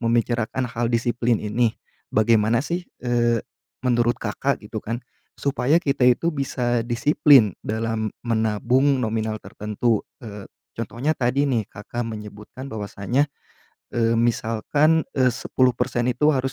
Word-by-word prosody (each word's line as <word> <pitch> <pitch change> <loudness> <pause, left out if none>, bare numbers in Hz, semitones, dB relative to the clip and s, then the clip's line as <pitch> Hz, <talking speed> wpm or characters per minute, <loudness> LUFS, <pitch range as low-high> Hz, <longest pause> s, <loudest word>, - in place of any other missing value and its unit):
membicarakan 120 +1 0
hal 120 0 -1
disiplin 120 0 +1
ini, 110 +2 +1 0.4
bagaimana 110 +2 +3
sih, 175 +2 -3 0.2
eee, 120 -2 +2 0.4
menurut 120 -1 +2
Kakak 120 +4 -2
gitu 110 +1 -5
kan, 115 +3 -4 0.3
supaya 140 +1 +1
kita 135 -4 +2
itu 165 +7 +2
bisa 125 -4 -1
disiplin 130 - +5
dalam 110 0 -2 0.2
menabung 120 +4 +2
nominal 110 -1 -1
tertentu? 105 +1 -1 0.3
Eee, 105 -2 -8 0.3
contohnya 120 +6 -1
tadi 130 +3 +1
nih, 120 -7 0
Kakak 120 +3 -5
menyebutkan 105 +5 -8
bahwasanya, 105 +6 -1 0.7
eee, 115 0 +2
misalkan, 120 +7 +2
eee, 130 -1 +4
10% 125 0 0
itu 150 +5 +2
harus 130 0 -1
120 Hz, 120 wpm, -23 LUFS, 110-130 Hz, 0.7 s, disiplin